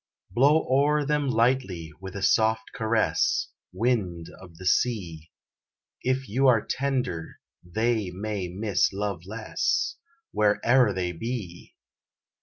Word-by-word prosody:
Blow 145 +6 +4
o'er 145 +3 +3
them 145 -1 0
lightly 115 -9 +1
with 95 0 -8
a 100 - -4
soft 110 +2 +2
caress, 110 -2 +1 0.2
Wind 90 -6 -1
of 90 -3 -14
the 95 - -10
sea, 90 -7 0 0.7
If 130 0 -1
you 130 +6 +2
are 115 -4 +4
tender 125 -12 -2 0.2
they 110 +2 0
may 100 0 -4
miss 100 +3 0
love 100 -3 -3
less 325 - -1 0.3
Where 105 -1 +2
e'er 120 -2 +5
they 90 -2 -2
be. 95 -1 -6
110 Hz, 120 wpm, -26 LUFS, 95-130 Hz, 0.7 s, e'er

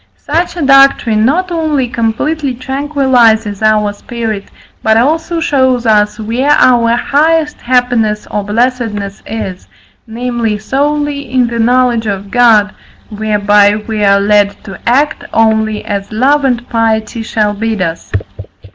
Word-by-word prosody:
Such 335 +4 -2
a 335 - -2
doctrine 275 -5 +4
not 355 +8 0
only 310 -6 -1
completely 250 +5 -2
tranquilizes 255 -6 +1
our 215 -1 +2
spirit, 220 -1 -5 0.4
but 220 0 +2
also 320 +7 0
shows 260 -6 +1
us 210 -1 +2
where 235 +6 -1
our 235 -2 +3
highest 300 +4 0
happiness 245 -4 0
or 210 - -2
blessedness 210 -2 -2
is, 190 - -6 0.4
namely, 235 -1 -2
solely 285 +4 -2
in 255 -1 +2
the 235 0 -4
knowledge 240 -1 +2
of 200 -1 -4
God, 225 -4 +3 0.4
whereby 205 -1 +2
we 215 0 -4
are 200 0 +4
led 205 0 +1
to 195 - -10
act 285 +6 +1
only 220 -1 +1
as 200 -1 -4
love 275 +6 +2
and 245 -2 -1
piety 225 0 -1
shall 215 -2 -1
bid 220 +1 -3
us. 165 -3 -4
230 Hz, 130 wpm, -12 LUFS, 210-265 Hz, 0.4 s, doctrine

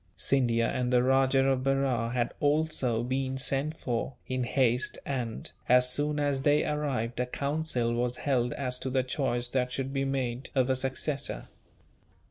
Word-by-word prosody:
Scindia 120 -4 +2
and 125 -1 -1
the 125 -1 +4
Rajah 135 +1 +3
of 130 -1 +1
Berar 135 -4 +1
had 120 -1 0
also 145 -6 +1
been 130 +1 -2
sent 140 +4 -1
for, 125 -1 -3
in 130 -1 -2
haste 125 -1 +1
and, 125 -5 -3 0.2
as 125 0 +5
soon 150 +2 0
as 145 -2 0
they 145 +2 +3
arrived, 135 -6 -2
a 125 - 0
council 140 -3 -1
was 120 +1 0
held 125 -4 +1
as 125 -2 -2
to 130 - -3
the 130 0 +1
choice 125 -2 -1
that 125 0 0
should 135 +1 -3
be 135 -1 0
made 130 -2 -2
of 130 -1 +3
a - - +2
successor. 135 +2 -2
130 Hz, 165 wpm, -29 LUFS, 125-135 Hz, 0.2 s, as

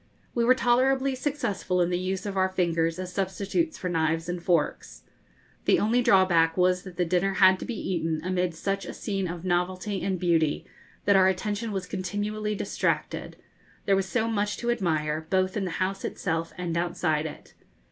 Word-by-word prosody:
We 235 - +1
were 255 +2 +5
tolerably 265 +2 +2
successful 250 -9 -1
in 175 0 +2
the 175 - 0
use 185 +2 -3
of 200 -1 -4
our 190 0 +2
fingers 170 -3 0
as 185 0 -6
substitutes 200 - -1
for 185 - -4
knives 165 -1 0
and 175 0 -3
forks. 170 -4 -1 0.6
The - - +5
only 230 +4 +2
drawback 180 -6 +4
was 180 0 +3
that 180 -2 -11
the 180 - +2
dinner 185 +3 +1
had 190 -1 +6
to - - -5
be 240 - -4
eaten 165 -3 -1
amid 180 -1 -1
such 195 +3 -2
a - - -6
scene 195 -3 -2
of 175 +1 -6
novelty 185 +2 -1
and 190 -1 -1
beauty, 165 -4 +1 0.4
that 200 - +5
our 190 -1 +6
attention 205 +4 -1
was 190 -2 -3
continually 205 +3 -3
distracted: - - -2 0.5
there 195 - +4
was 195 0 0
so 225 0 0
much 210 -2 -1
to 240 0 0
admire, 160 -7 -1
both 185 0 +1
in 200 -3 -1
the - - -2
house 190 +1 -2
itself 165 -2 -2
and 175 -2 -3
outside 165 -2 0
it. - - -11
185 Hz, 185 wpm, -27 LUFS, 175-205 Hz, 0.6 s, had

